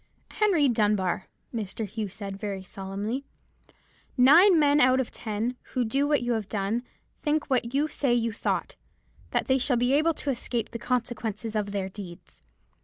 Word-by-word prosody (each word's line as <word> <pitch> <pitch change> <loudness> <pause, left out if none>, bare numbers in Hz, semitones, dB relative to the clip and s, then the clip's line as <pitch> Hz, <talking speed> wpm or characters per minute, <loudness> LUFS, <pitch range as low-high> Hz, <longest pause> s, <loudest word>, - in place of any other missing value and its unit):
"'Henry 375 -9 +3
Dunbar,' 205 -6 +1 0.3
Mr. 220 -1 -3
Hugh 210 0 -4
said, 195 0 -6
very 195 -1 -5
solemnly, 200 +7 -4 0.9
'nine 330 +9 +7
men 295 -1 +4
out 255 +1 +5
of 260 - -2
ten, 220 +3 -3 0.2
who 250 -2 +1
do 275 +6 +1
what 295 -4 +2
you 240 - -1
have 220 -4 -2
done, 210 +3 -1 0.4
think 300 -1 0
what 245 -1 +1
you 295 +2 +2
say 280 -4 -1
you 230 -2 +1
thought: - - -2 0.5
that - - 0
they 265 -1 +2
shall 255 -1 +2
be 245 +2 +2
able 310 +3 +3
to 285 - -2
escape 240 -2 -3
the 235 - -5
consequences 225 -3 -2
of 205 -1 -1
their 195 -2 -2
deeds. 190 -3 -11
235 Hz, 170 wpm, -27 LUFS, 205-270 Hz, 0.9 s, nine